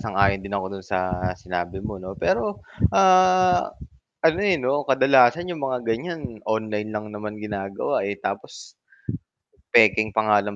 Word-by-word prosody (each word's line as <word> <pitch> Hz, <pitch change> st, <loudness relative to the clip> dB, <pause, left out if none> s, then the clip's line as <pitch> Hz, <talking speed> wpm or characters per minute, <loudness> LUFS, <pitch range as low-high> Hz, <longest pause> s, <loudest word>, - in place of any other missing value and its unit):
sang-ayon 100 Hz, -2 st, +1 dB
din 100 Hz, -, -8 dB
ako 95 Hz, -, -3 dB
dun 95 Hz, -, -11 dB
sa 90 Hz, -1 st, -2 dB, 0.2 s
sinabi 90 Hz, 0 st, -5 dB
mo 105 Hz, -2 st, -5 dB
'no 95 Hz, 0 st, -8 dB
pero, 205 Hz, +2 st, -1 dB, 0.3 s
ah, 185 Hz, -1 st, +5 dB, 0.6 s
ano 165 Hz, +3 st, +4 dB
eh, 200 Hz, -4 st, +3 dB
'no 135 Hz, +2 st, 0 dB
kadalasan 135 Hz, +5 st, +4 dB
yung 170 Hz, -4 st, -5 dB
mga 130 Hz, -2 st, -2 dB
ganyan 115 Hz, -1 st, -4 dB
online 110 Hz, -1 st, -2 dB
lang 105 Hz, 0 st, -5 dB
naman 105 Hz, 0 st, -6 dB
ginagawa, 100 Hz, -2 st, -3 dB
eh, 100 Hz, 0 st, -3 dB
tapos, -, -, -7 dB, 1.0 s
pekeng 110 Hz, -2 st, +5 dB
pangalan 105 Hz, -2 st, +2 dB
110 Hz, 140 wpm, -23 LUFS, 100-145 Hz, 1.0 s, ah